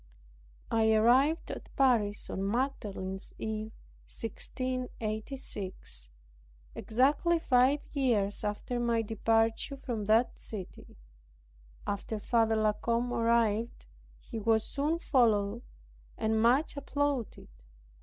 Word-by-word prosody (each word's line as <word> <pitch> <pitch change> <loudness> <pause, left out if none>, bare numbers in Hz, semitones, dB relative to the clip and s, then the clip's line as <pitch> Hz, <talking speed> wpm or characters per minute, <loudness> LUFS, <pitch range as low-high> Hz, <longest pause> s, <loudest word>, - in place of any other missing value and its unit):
I 220 -1 +3
arrived 255 +9 +3
at - - -8
Paris 230 -7 +2
on 190 - -3
Magdalene's 205 -6 -2
eve, 220 0 -4 0.4
1686, 225 - -3 0.6
exactly 285 +9 +2
five 270 -1 +3
years 225 -9 +1
after 210 +4 -2
my 235 -1 +1
departure 225 +5 0
from 230 -6 -4
that 225 +3 +3
city. 200 -5 -9 0.9
After 205 +2 -3
Father 225 +1 +2
La 215 -1 +2
Combe 235 +3 -1
arrived, 230 -1 +1 0.3
he 230 - -7
was 220 0 +2
soon 295 +7 -1
followed 230 -8 +2 0.6
and 220 0 +1
much 255 +8 +3
applauded. 280 - -2
230 Hz, 95 wpm, -30 LUFS, 215-255 Hz, 0.9 s, I